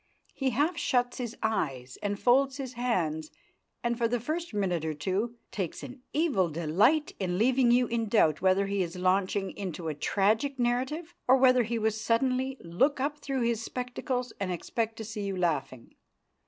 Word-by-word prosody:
He 270 -2 0
half 295 +8 +1
shuts 245 0 +1
his 240 -2 -4
eyes 135 - -2
and 205 0 -2
folds 265 +2 +3
his 265 -3 -5
hands, 170 - -1 0.5
and, 235 0 0
for 235 - +3
the 240 +1 0
first 325 +8 -3
minute 190 -6 -1
or 160 -1 -2
two, 195 +10 -2 0.2
takes 185 -6 -4
an 255 0 -9
evil 280 - +2
delight 175 - +2
in 180 -2 -1
leaving 250 +3 +3
you 245 +1 +5
in 230 -2 -2
doubt 160 -9 +3
whether 190 +1 +3
he 200 0 -1
is 170 0 -3
launching 190 +2 +1
into 175 -4 -5
a - - -2
tragic 215 - +1
narrative 260 +8 -1
or 260 +1 +7
whether 255 -1 +5
he 235 0 -1
will 220 0 +2
suddenly 255 +4 0
look 260 - +1
up 290 +2 -1
through 270 -3 -2
his 235 -1 +1
spectacles 250 0 -3
and 195 -2 -2
expect 225 +5 -2
to 220 - -5
see 215 0 -5
you 195 -2 -3
laughing. 150 -8 -2
230 Hz, 180 wpm, -29 LUFS, 185-255 Hz, 0.5 s, or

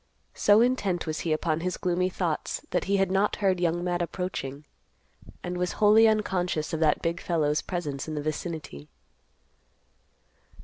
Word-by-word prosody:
So 205 +2 +5
intent 210 -8 +1
was 155 -1 -3
he 165 - -2
upon 155 0 0
his 180 +2 -2
gloomy 180 0 0
thoughts 175 -4 -3
that - - 0
he 200 +1 +2
had 195 -1 +1
not 195 +2 +2
heard 190 -3 +1
Young 175 0 0
Matt 175 -1 -1
approaching, 160 -6 -4 0.8
and 180 0 -4
was 180 0 -1
wholly 215 +2 +6
unconscious 180 -8 0
of 160 - -1
that 155 -2 +2
big 170 +1 -1
fellow's 150 -3 +1
presence 150 -7 -4
in 155 - -4
the 150 - -2
vicinity. 155 - -5
175 Hz, 160 wpm, -27 LUFS, 155-190 Hz, 0.8 s, wholly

